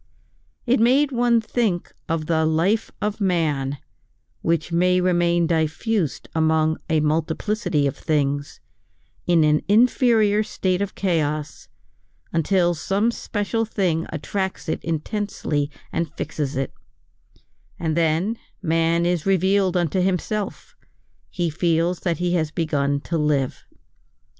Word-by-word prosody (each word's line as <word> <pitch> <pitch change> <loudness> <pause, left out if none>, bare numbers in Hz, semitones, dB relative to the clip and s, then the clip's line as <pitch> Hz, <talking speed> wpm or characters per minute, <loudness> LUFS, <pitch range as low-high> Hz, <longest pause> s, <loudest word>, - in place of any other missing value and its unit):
It 250 -1 +3
made 265 +5 +4
one 240 -2 +3
think 220 -5 -1 0.2
of 160 -1 -1
the 160 0 +1
life 170 +8 +1
of 210 +1 -2
man 150 -7 0 0.6
which 165 0 0
may 180 +2 +3
remain 175 -1 +2
diffused 165 - -1
among 160 0 +2
a 160 -1 +2
multiplicity 160 +2 0
of 140 - -1
things, 145 -2 -1 0.7
in 170 -2 +4
an 150 0 +3
inferior 220 -1 +4
state 185 -3 -1
of 200 -1 -3
chaos, 155 -6 -1 0.7
until 175 +1 +2
some 195 +8 0
special 225 0 -2
thing 185 -7 -1
attracts 190 +5 -3
it 160 - -2
intensely 160 -3 -2 0.2
and 165 -3 -1
fixes 145 -3 -3
it; 135 -1 -2 1.0
and 160 -2 -1
then 170 +7 +1 0.2
man 165 -1 +1
is 175 0 0
revealed 190 0 +2
unto 175 +1 +1
himself, 190 +3 -2 0.5
he 175 -2 -1
feels 170 +2 +1
that 170 -4 -1
he 175 +1 0
has 160 -3 +1
begun 145 -3 0
to 165 +1 -2
live. 145 -3 0
170 Hz, 120 wpm, -23 LUFS, 155-200 Hz, 1.0 s, made